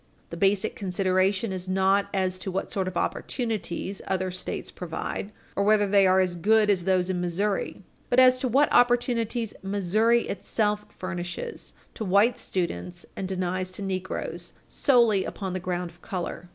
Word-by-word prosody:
The - - -4
basic 195 +3 +1
consideration 190 +2 +1
is 185 0 -5
not 190 +1 +3
as 185 -2 0
to 195 - -4
what 190 +1 -3
sort 190 -2 -1
of 185 -1 -3
opportunities 205 -3 -2
other 185 -1 -1
States 185 - -5
provide, 180 +3 -5 0.2
or 200 - +1
whether 205 0 +4
they 195 -1 +5
are 185 0 +4
as 185 -2 +1
good 210 +4 +4
as 180 -3 0
those 185 -1 +2
in 180 -1 -2
Missouri, 195 +3 -1 0.3
but 245 - +4
as 255 0 +6
to 255 - 0
what 275 +5 +3
opportunities 240 -2 +2
Missouri 205 +4 +2
itself 210 +1 -1
furnishes 185 - -6 0.2
to 225 - -5
white 205 +5 +3
students 175 - -3
and 190 - -3
denies 185 0 -2
to 185 +2 -8
negroes 185 -1 -4
solely 235 -8 +3
upon 190 -1 -5
the 185 - -2
ground 180 -1 -3
of 175 - -23
color. 180 -1 -5
190 Hz, 165 wpm, -26 LUFS, 185-210 Hz, 0.3 s, as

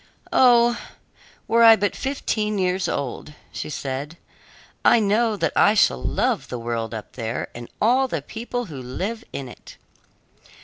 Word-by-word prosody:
"Oh, 240 -2 +5 0.7
were 230 +1 +3
I 225 -1 +9
but 205 -1 -1
fifteen 215 -6 -2
years 185 0 0
old!" 140 +2 -4 0.2
said 140 +2 -5 0.2
she. - - -30 0.5
"I 240 - +6
know 215 +1 +1
that - - -1
I 210 - +5
shall 65 - +3
love - - -1
the 125 - -5
world 115 -1 -3
up 110 -2 -7
there, 115 -1 -4
and 120 0 -9
all 255 +5 +3
the 165 - -4
people 240 - -5
who 145 -9 -8
live 195 - -4
in 135 - -5
it." 120 - -13
200 Hz, 150 wpm, -23 LUFS, -, 0.7 s, I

